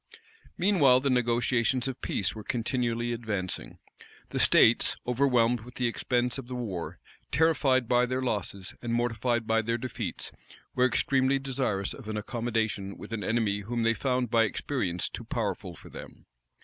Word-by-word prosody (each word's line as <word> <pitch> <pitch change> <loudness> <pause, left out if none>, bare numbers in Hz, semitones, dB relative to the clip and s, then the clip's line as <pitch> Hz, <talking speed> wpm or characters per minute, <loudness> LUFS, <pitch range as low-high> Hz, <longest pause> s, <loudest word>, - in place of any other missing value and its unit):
Meanwhile 155 -10 +5
the 140 0 +1
negotiations 120 +1 +1
of 130 -1 -5
peace 100 - 0
were 110 - -8
continually 120 0 -1
advancing. 110 -6 -3 0.5
The - - -2
states, 115 - +5
overwhelmed 125 -2 +3
with 120 +3 -13
the 125 - -1
expense 125 +2 0
of 125 - -8
the 125 - -5
war, 100 -9 -4 0.3
terrified 135 -5 +3
by 125 0 +3
their 130 +1 -1
losses, 100 -5 -3
and 120 - -3
mortified 120 0 0
by 110 0 +2
their 115 +2 -1
defeats, 120 -6 -4 0.4
were 125 0 +4
extremely 135 +2 +2
desirous 130 -8 -1
of 125 -6 -10
an 110 - -2
accommodation 110 -3 -2
with - - -9
an 105 -2 -3
enemy 110 -3 +1
whom 115 +3 -2
they 115 0 +3
found 125 -1 -1
by 115 -1 +5
experience 100 -7 -2
too - - -7
powerful - - -3
for - - -14
them. - - -11
120 Hz, 160 wpm, -28 LUFS, 110-130 Hz, 0.5 s, Meanwhile